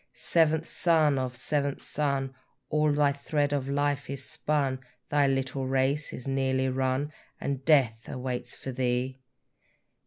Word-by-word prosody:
Seventh 160 -1 +2
son 155 -5 +3
of 130 -1 -3
seventh 140 +2 -1
son, 140 -2 -1 0.4
All 150 0 +3
thy 145 -1 +3
thread 145 +1 0
of 135 -1 -1
life 145 -1 0
is 140 -1 -5
spun, 140 -3 0 0.3
Thy 145 -1 +4
little 135 0 -1
race 135 +3 +1
is 125 - -7
nearly 130 -1 +1
run, 130 +3 0 0.3
And 140 -1 -3
death 130 -7 +3
awaits 125 -2 -4
for 135 - -6
thee! 125 +1 -1
135 Hz, 135 wpm, -28 LUFS, 130-145 Hz, 0.4 s, Thy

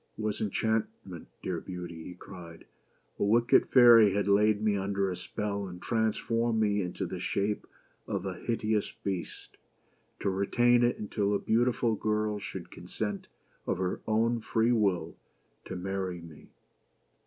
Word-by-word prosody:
" - - -42
It - - -6
was 105 -1 -2
enchantment, 110 +1 -2 0.2
dear 90 -3 -2
Beauty," 90 -3 -7
he 90 - -8
cried. 85 -3 -11 0.5
"A - - +1
wicked 115 +4 +4
fairy 115 -5 +7
had 100 0 0
laid 105 +1 +4
me 105 -1 +1
under 100 0 -1
a - - -3
spell, 100 +2 -4
and 90 -1 -9
transformed 115 +1 0
me 105 -1 +2
into 90 -1 -3
the - - -5
shape 105 +1 -1 0.4
of - - -3
a - - -2
hideous 110 -2 -1
Beast; 95 -4 -5 0.6
to 100 - +1
retain 120 +5 +3
it 120 - +2
until 105 -1 -1
a - - +1
beautiful 120 0 +1
girl 105 0 -1
should 95 -3 -7
consent, 100 +3 -5 0.4
'of - - 0
her 90 0 -2
own 115 +2 +2
free 115 +2 +1
will, 95 -8 +1 0.5
to 95 - -6
marry 95 -1 -3
me. 85 -3 -13
105 Hz, 155 wpm, -29 LUFS, 95-110 Hz, 0.6 s, fairy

